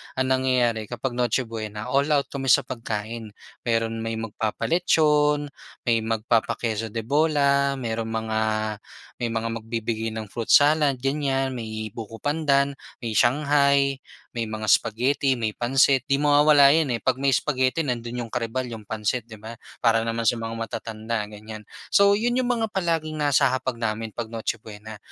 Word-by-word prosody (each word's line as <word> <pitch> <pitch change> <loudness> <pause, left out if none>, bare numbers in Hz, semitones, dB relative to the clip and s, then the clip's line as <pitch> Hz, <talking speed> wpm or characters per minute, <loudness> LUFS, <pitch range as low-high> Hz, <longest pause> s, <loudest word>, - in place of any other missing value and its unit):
ang 130 0 0
nangyayari 125 -4 +1
kapag 120 +3 -4
Noche 125 +1 +1
Buena, 110 0 -6
all 140 +2 +2
out 145 -2 +1
kami 135 -1 -4
sa - - +5
pagkain. 115 -2 -5 0.3
Meron 115 -1 0
may 115 0 -3
magpapa-lechon 150 +6 +1 0.3
may 115 -2 +2
magpapa-queso 115 0 0
de 115 - -2
bola, 140 0 +2
merong 115 -3 -3
mga 110 -1 -2 0.8
may 120 - 0
mga 115 0 -1
magbibigay 115 0 -3
ng 110 - -4
fruit 115 +1 -5
salad 145 -1 +5
ganyan, 135 0 -1
may 110 -2 -5
buko 115 -1 -8
pandan, 140 -1 +1 0.3
may 115 -2 -3
shanghai, 140 +1 +3 0.3
may 115 -3 -3
mga 110 0 -4
spaghetti, 130 +6 +2
may 110 -2 -2
pansit. 130 +2 +2
'Di 140 - +3
mawawala 145 -1 +6
'yon, 160 -3 +2
eh, - - -13
'pag 130 0 0
may 140 - +3
spaghetti 130 +3 +1
nandun 120 -2 -3
'yong 115 - -14
karibal 125 +2 -2
yung 115 -3 -7
pansit, 110 +2 -2
'di 110 - -10
ba? 110 +2 -9 0.2
Para 115 -1 +3
naman 115 0 -2
sa 115 0 +2
mga 115 0 -4
matatanda, 115 0 -4
ganyan. 110 +1 -9 0.3
So. 200 0 +5
'yon 240 +3 0
'yong 255 0 0
mga 230 -2 +1
palaging 160 -4 -1
nasa 145 -3 +3
hapag 130 -2 -2
namin 115 -1 -2
pag 115 +2 -5
Noche 115 +1 -2
Buena. 110 0 -10
120 Hz, 160 wpm, -24 LUFS, 115-140 Hz, 0.8 s, mawawala